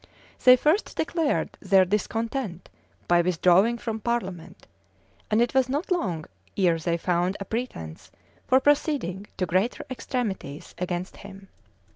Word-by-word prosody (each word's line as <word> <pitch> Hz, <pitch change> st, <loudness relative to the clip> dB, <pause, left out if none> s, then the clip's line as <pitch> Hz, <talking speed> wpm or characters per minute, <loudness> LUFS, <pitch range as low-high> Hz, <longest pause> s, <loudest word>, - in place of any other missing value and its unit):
[] -, -, -24 dB
They 250 Hz, 0 st, +10 dB
first 305 Hz, -, +1 dB
declared 320 Hz, -2 st, 0 dB
their 190 Hz, -1 st, +4 dB
discontent 215 Hz, -, -2 dB, 0.4 s
by 175 Hz, 0 st, +5 dB
withdrawing 185 Hz, +6 st, +3 dB
from 225 Hz, -2 st, -4 dB
parliament; 195 Hz, -8 st, -4 dB, 0.6 s
and 220 Hz, +2 st, +4 dB
it 240 Hz, -, -2 dB
was 260 Hz, -1 st, +3 dB
not 295 Hz, +8 st, -2 dB
long 180 Hz, -, -1 dB, 0.3 s
ere 175 Hz, -4 st, +3 dB
they 170 Hz, +1 st, 0 dB
found 180 Hz, +2 st, 0 dB
a 200 Hz, -, -5 dB
pretence 205 Hz, -, -5 dB, 0.4 s
for 260 Hz, -, +5 dB
proceeding 265 Hz, -, 0 dB
to 185 Hz, -, 0 dB
greater 185 Hz, +7 st, 0 dB
extremities 215 Hz, -, -4 dB
against 180 Hz, 0 st, -3 dB
him. 195 Hz, -1 st, -12 dB
200 Hz, 135 wpm, -26 LUFS, 180-250 Hz, 0.6 s, They